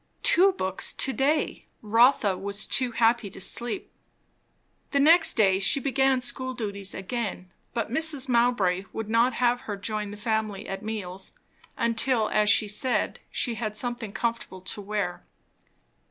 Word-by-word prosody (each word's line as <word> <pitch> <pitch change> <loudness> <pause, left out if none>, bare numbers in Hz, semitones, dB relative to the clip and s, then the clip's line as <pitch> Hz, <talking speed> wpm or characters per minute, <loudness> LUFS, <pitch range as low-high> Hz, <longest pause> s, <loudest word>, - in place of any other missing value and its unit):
Two 385 +2 +5
books 190 - -1
to 265 - -1
day! 290 +4 0 0.2
Rotha 225 -2 +4
was 200 +2 -2
too 255 -3 +2
happy 230 -2 +2
to - - -10
sleep. 240 - -2 1.0
The 280 - +1
next 325 +3 +5
day 195 -3 +4
she 195 +8 +2
began 265 -1 +1
school 260 +1 -2
duties 200 -4 -4
again; 190 -3 -4 0.2
but 230 -2 -2
Mrs. 290 -1 +1
Mowbray 235 -7 +2
would 220 -1 -5
not 235 +3 +3
have 245 0 +1
her 205 - -3
join 210 0 -3
the 205 - -8
family 215 -2 -2
at 195 0 -5
meals, 200 -4 -6 0.4
until, 230 -1 +1
as 210 -1 +2
she 205 +1 +4
said, 245 +5 -1
she 240 - -2
had 215 -1 -4
something 240 -2 -3
comfortable 230 -3 -3
to 205 - -2
wear. 200 -3 -3
225 Hz, 150 wpm, -26 LUFS, 200-250 Hz, 1.0 s, Two